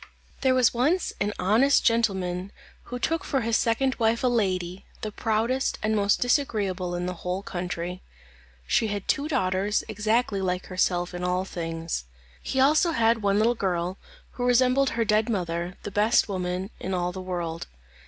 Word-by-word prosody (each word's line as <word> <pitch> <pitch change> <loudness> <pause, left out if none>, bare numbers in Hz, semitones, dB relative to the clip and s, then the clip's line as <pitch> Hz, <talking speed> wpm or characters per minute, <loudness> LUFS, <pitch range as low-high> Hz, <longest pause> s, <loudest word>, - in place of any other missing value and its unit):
There 260 -1 +3
was 255 -3 +4
once 300 +10 +1
an 205 +1 +1
honest 235 +9 +3
gentle 230 -3 +3
man 180 +1 -4 0.3
who 245 - -5
took 325 +6 -1
for 270 - 0
his 230 0 0
second 260 +4 +2
wife 230 +1 +2
a - - +4
lady, 185 -6 -1
the 215 - -4
proudest 225 +5 0
and 215 0 +1
most 200 -1 +2
disagreeable 205 - 0
in 175 0 -2
the 180 - -2
whole 180 +2 -3
country. 180 0 -4 0.6
She 220 - +2
had 205 -2 -4
two 285 +2 +1
daughters 195 -6 0
exactly 215 -1 0
like 180 -1 -1
herself 180 -1 0
in 175 0 -5
all 180 +1 0
things. 165 - -4 0.4
He 265 - -2
also 305 +5 +4
had 230 -3 +2
one 200 -1 +2
little 225 +3 +3
girl, 185 -4 -2 0.3
who 245 - -3
resembled 255 +2 +4
her 230 - +2
dead 215 +2 +2
mother, 175 -3 -2
the 205 - -5
best 215 +4 +3
woman 185 0 -3
in 190 0 -3
all 175 0 -1
the 185 +1 -7
world. 175 -3 -4
205 Hz, 175 wpm, -26 LUFS, 180-235 Hz, 0.6 s, was